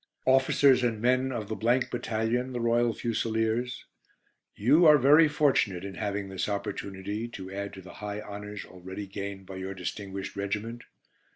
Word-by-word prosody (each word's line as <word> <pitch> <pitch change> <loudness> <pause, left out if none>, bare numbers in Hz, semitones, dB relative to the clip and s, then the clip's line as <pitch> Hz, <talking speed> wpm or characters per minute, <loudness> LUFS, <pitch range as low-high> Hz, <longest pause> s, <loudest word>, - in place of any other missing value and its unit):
"Officers 130 0 +5
and 115 -3 0
men 130 +3 +2
of 115 -5 -4
the 110 - -3
Battalion, 120 +1 0
the 120 - -2
Royal 120 0 +2
Fusiliers: 115 +2 -1 0.7
You 150 - +5
are 150 -1 +9
very 150 +4 +6
fortunate 135 -11 +1
in 100 - -6
having 100 -1 -3
this 95 +1 -3
opportunity 100 +1 -4
to 95 -5 -8
add 100 +1 -4
to 95 -1 -10
the 90 - -11
high 105 0 -4
honours 105 0 -7
already 95 +3 -8
gained 100 0 -6
by 95 0 -8
your 95 +1 -5
distinguished 95 +1 -5
regiment. 105 +4 -4
110 Hz, 155 wpm, -28 LUFS, 100-120 Hz, 0.7 s, are